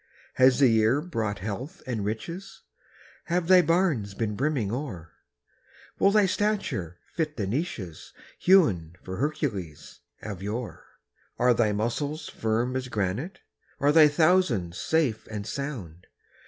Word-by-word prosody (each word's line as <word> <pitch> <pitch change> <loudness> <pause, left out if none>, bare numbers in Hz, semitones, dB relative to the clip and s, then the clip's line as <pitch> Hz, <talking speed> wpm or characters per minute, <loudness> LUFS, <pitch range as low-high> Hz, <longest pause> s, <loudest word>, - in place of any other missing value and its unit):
Has 130 -1 +5
the 140 - +6
year 110 +3 +3
brought 115 - -3
health 120 - -6
and 115 -5 -3
riches? 140 - -5 0.6
Have 175 0 0
thy 185 0 +7
barns 155 - +1
been 110 -1 -2
brimming 130 -5 0
o'er? 105 - -5 0.9
Will 195 - +5
thy 210 0 +4
stature 190 - -1 0.2
fit 155 -3 -2
the 105 - -1
niches 100 - -4 0.3
Hewn 100 - +4
for 95 0 -6
Hercules 110 - -3 0.2
of 100 -4 -6
yore? 110 +4 -5 0.5
Are 125 0 +4
thy 115 -2 +2
muscles 120 +9 -2
firm 115 +3 -1
as 130 -1 -2
granite? 110 - -3 0.4
Are 145 +1 +4
thy 155 0 +8
thousands 155 - +2
safe 150 -9 0
and 105 -2 -5
sound? 105 - -6
125 Hz, 130 wpm, -27 LUFS, 100-155 Hz, 0.9 s, thy